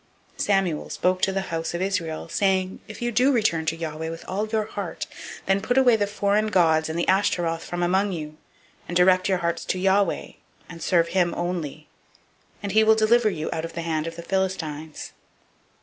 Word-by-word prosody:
007:003 - - -4
Samuel 190 -6 +1
spoke 185 0 0
to - - +3
all 195 - -3
the 195 - +1
house 165 -2 -3
of 170 - -3
Israel, 170 -5 -2
saying, 190 -1 0
If 215 +2 -8
you 240 - 0
do 250 +5 +4
return 185 - +1
to 160 - +1
Yahweh 160 0 -4
with 165 0 -8
all 205 +3 -2
your 215 -1 0
heart, 200 -5 -5 0.4
then 195 +1 +2
put 245 +5 0
away 250 -3 +6
the 205 -2 0
foreign 205 +1 +1
gods 160 -6 +3
and 160 - -3
the 170 - 0
Ashtaroth 175 -4 +1
from 175 0 -3
among 190 +3 +2
you, 155 -3 -6 0.5
and 175 - 0
direct 185 +1 +4
your 190 - +3
hearts 170 -1 -2
to - - -1
Yahweh, 190 0 +1 0.4
and 165 -1 -10
serve 170 -2 +2
him 175 -1 +1
only; 165 -4 -4 0.8
and 200 - -2
he 220 +2 +5
will 220 0 +6
deliver 220 +1 +4
you 160 -5 -4
out 160 - -3
of 165 - -6
the 170 - -4
hand 160 -1 -1
of 165 - -6
the 170 - -8
Philistines. 165 -5 -3
185 Hz, 205 wpm, -24 LUFS, 165-200 Hz, 0.8 s, away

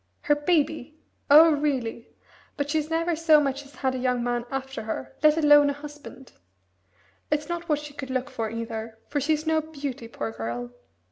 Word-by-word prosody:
"Her 295 - +3
baby? 305 -1 0 0.3
Oh, 315 +3 +9
really! 270 -6 -1 0.5
But 285 0 -2
she's 310 -1 0
never 330 +1 0
so 315 -1 +5
much 275 -1 -1
as 275 - -19
had 260 0 -1
a 260 - -3
young 250 -1 0
man 240 0 -1
after 270 0 -4
her, 130 -11 -5
let 305 +1 +5
alone 295 -2 +6
a - - 0
husband. 290 -2 -11 1.0
It's 300 0 0
not 345 0 -4
what 300 - +3
she 295 0 -9
could 275 -2 -7
look 260 +1 -2
for, 225 -1 -3
either, 225 0 -5
for 290 - -1
she's 305 +2 0
no 315 0 +2
beauty 285 -6 -6
poor 225 - -5
girl!" 120 - -5
285 Hz, 185 wpm, -26 LUFS, 245-305 Hz, 1.0 s, Oh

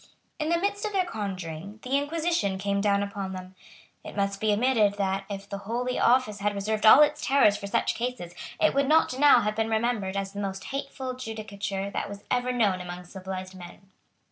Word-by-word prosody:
In 305 0 -1
the 340 - +3
midst 405 +3 -1
of 425 -1 -3
their 375 -2 +2
conjuring, 195 - -5
the 255 +2 -1
Inquisition 290 - 0
came 200 +1 -1
down 200 -1 +2
upon 200 -1 -5
them. 185 0 -8 0.5
It - - -9
must 200 0 -1
be 215 -1 +2
admitted 215 -2 +3
that, 195 -1 -1
if 200 0 -6
the 200 -1 -5
Holy 240 +5 -2
Office 240 -4 +3
had 205 0 0
reserved 215 +2 0
all 275 +7 +10
its 300 0 0
terrors 265 -7 +4
for 205 -1 -6
such 200 - +1
cases, 235 -8 -4 0.3
it 315 - +3
would 275 0 +2
not 305 -4 +3
now 290 -4 +7
have 210 0 -1
been 220 0 0
remembered 220 -4 0
as 195 0 -3
the 200 - -6
most 195 -1 -4
hateful 275 -1 -5
judicature 200 -4 -5
that - - -3
was 200 0 -9
ever 250 0 +1
known 205 -7 +1
among 180 0 -7
civilised 185 0 -7
men. 185 +1 -13
205 Hz, 200 wpm, -27 LUFS, 195-255 Hz, 0.5 s, all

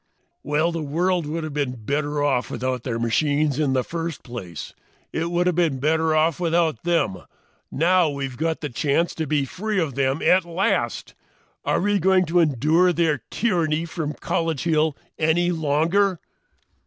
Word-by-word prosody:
"Well, 155 +3 +1
the 165 -1 -3
world 170 +3 0
would 160 +2 -3
have 155 -2 -5
been 125 -6 -3
better 145 +2 -1
off 135 -4 +1
without 130 -1 -2
their 115 -1 -3
machines 145 +5 +1
in 145 -4 +1
the 130 -1 +1
first 165 -1 -5
place. 95 - -7 0.4
It 165 +1 -1
would 175 +1 +1
have 180 -2 +1
been 165 -6 +1
better 160 +2 +2
off 155 +1 +2
without 165 -6 +1
them. 165 - +1 0.5
Now 175 +2 +3
we've 135 -2 -4
got 160 +3 -2
a 150 - -2
chance 150 +5 0
to 160 -2 -3
be 145 -1 +1
free 210 +7 -2
of 160 -6 -1
them 135 +2 0
at 185 +1 +4
last! 175 +3 -1 0.5
Are - - +1
we 205 +1 +2
going 185 +1 +3
to 175 +2 +2
endure 160 +4 +3
their 160 -6 +1
tyranny 170 -7 0
from 160 -2 -4
College 165 -4 -2
Hill 155 -3 +1 0.2
any 170 +3 +2
longer?" 165 +4 +1
160 Hz, 165 wpm, -23 LUFS, 145-170 Hz, 0.5 s, at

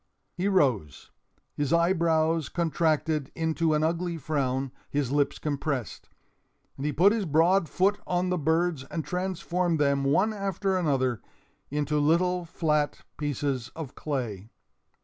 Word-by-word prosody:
He 180 +2 -1
rose, 125 - +1 0.4
his 145 -2 -2
eyebrows 165 -3 +2
contracted 160 -3 0
into 160 -1 +1
an 150 - +1
ugly 170 +1 -1
frown, 135 -3 -1 0.2
his 140 -3 -1
lips 145 0 +1
compressed. 140 -5 -3 0.7
And 140 - -3
he - - +1
put 185 +7 +5
his 220 -3 -1
broad 165 +3 +3
foot 195 +2 +2
on 180 0 0
the 180 - +1
birds 160 -1 +1
and 155 +2 -4
transformed 180 0 -1
them, 140 -1 +2
one 190 +11 +2
after 195 -1 -1
another, 130 - +1 0.5
into 150 +1 0
little 175 +4 +2
flat 150 -3 0 0.2
pieces 140 -4 -2
of 155 -5 -6
clay. 115 -9 -4
155 Hz, 130 wpm, -27 LUFS, 140-175 Hz, 0.7 s, put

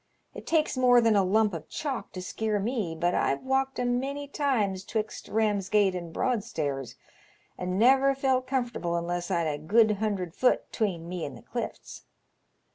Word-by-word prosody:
It - - -10
takes 315 -3 +2
more 250 -1 +5
than 225 -2 +3
a 200 - +4
lump 210 +2 +2
of 160 -2 -7
chalk 275 -5 -4
to 185 - -6
skeer 215 +2 -1
me, 205 -5 -2
but 175 0 +1
I've 135 - 0
walked 265 0 0
a 250 - -1
many 270 +4 -1
times 225 -10 0
'twixt 215 +1 -4
Bamsgate 205 -2 +2
and 170 -2 -5
Broadstairs, 155 - -2 0.6
and 180 0 -3
never 270 +4 +5
felt 260 -1 +1
comfortable 240 -10 -1
unless 175 +1 -2
I'd 170 -3 +1
a 150 -2 -2
good 215 +6 +3
hundred 195 -5 -2
foot 250 +5 +1
'tween 180 -7 -1
me 180 -1 -4
and 140 - -6
the - - -15
clifts. - - -6
210 Hz, 170 wpm, -28 LUFS, 180-255 Hz, 0.6 s, more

